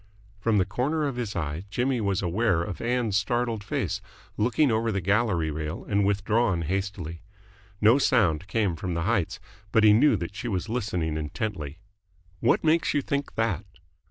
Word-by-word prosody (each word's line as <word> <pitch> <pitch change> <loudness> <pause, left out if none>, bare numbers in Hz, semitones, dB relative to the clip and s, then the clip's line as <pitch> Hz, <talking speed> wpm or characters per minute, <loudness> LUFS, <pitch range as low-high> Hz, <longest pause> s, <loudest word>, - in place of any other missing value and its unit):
From 110 0 +2
the 95 - +3
corner 135 - -1
of 140 -3 -2
his 115 -4 -3
eye 80 +1 -3
Jimmy 125 +3 0
was 100 -2 0
aware 90 -1 +1
of 95 0 -6
Ann's 120 -3 0
startled 115 +1 -1
face, 105 - -2 0.3
looking 125 +5 +2
over 110 +1 +1
the 100 - 0
gallery 95 -4 +1
rail 75 0 -5
and 100 0 +2
withdrawn 100 -2 +1
hastily. 90 -2 -3 0.6
No 115 +6 +6
sound 95 - +2
came 100 -4 0
from 85 +2 -4
the 85 - -1
heights, 100 -3 0 0.3
but 110 - +4
he 105 -1 +8
knew 125 +3 +5
that 85 +1 -5
she 120 - -5
was 100 -1 -2
listening 90 -9 -1
intently. 75 -1 -4 0.6
"What - - +2
makes 160 +1 +2
you 145 - +1
think 140 +1 -2
that?" 105 -5 0
100 Hz, 170 wpm, -26 LUFS, 90-115 Hz, 0.6 s, he